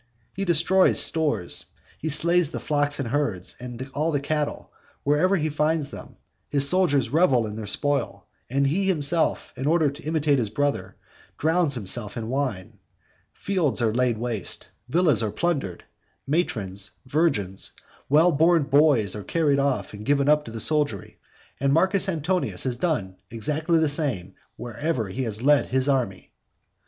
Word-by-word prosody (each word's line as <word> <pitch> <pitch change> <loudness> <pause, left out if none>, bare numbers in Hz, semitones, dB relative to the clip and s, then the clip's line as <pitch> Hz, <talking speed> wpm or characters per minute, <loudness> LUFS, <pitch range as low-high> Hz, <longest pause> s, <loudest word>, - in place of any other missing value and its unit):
He 195 +1 -3
destroys 175 +2 +4
stores, 150 - +2 0.3
he 160 - -3
slays 170 +2 +3
the - - -5
flocks 145 -1 0
and 130 -4 -3
herds, 115 -10 -1
and 125 +1 -7
all 155 +3 0
the 145 - 0
cattle, 150 +1 -3 0.3
wherever 150 +7 +2
he 155 -4 0
finds 150 -1 0
them, - - -10 0.3
his 140 -1 +1
soldiers 145 -9 +2
revel 140 -7 +3
in 105 -1 -6
their 110 -1 -6
spoil, 145 +3 0 0.2
and 140 +3 +1
he 175 +8 +1
himself, 165 -2 +1
in 130 - -3
order 160 -2 +3
to 145 +3 -12
imitate 150 -3 +1
his 110 -4 -1
brother, 145 +6 -2 0.4
drowns 160 -2 +1
himself 105 0 -4
in 115 -1 -4
wine. 125 -9 -3 0.5
Fields 180 -10 -1
are 115 -2 +1
laid 125 -1 +1
waste, 115 -4 -5 0.2
villas 155 -5 +3
are 110 - -1
plundered, 135 - -2 0.4
matrons, 105 - -2 0.2
virgins, 130 - -1 0.4
well 160 +5 +5
born 165 +1 +3
boys 140 -8 +3
are 105 - -6
carried 150 - +1
off 130 -9 -1
and 105 0 -8
given 140 -1 +2
up 150 0 +3
to - - -8
the 115 - -6
soldiery, 145 -3 -1 0.4
and 140 0 +1
Marcus 190 +4 +3
Antonius 175 +2 -1
has 130 -2 -1
done 100 - -2
exactly 150 +8 0
the 160 -1 +3
same 135 - -2 0.2
wherever 120 0 -3
he 120 +8 -4
has 115 -2 -3
led 145 +1 +4
his 130 +1 0
army. 125 -9 -1
145 Hz, 160 wpm, -24 LUFS, 115-160 Hz, 0.5 s, well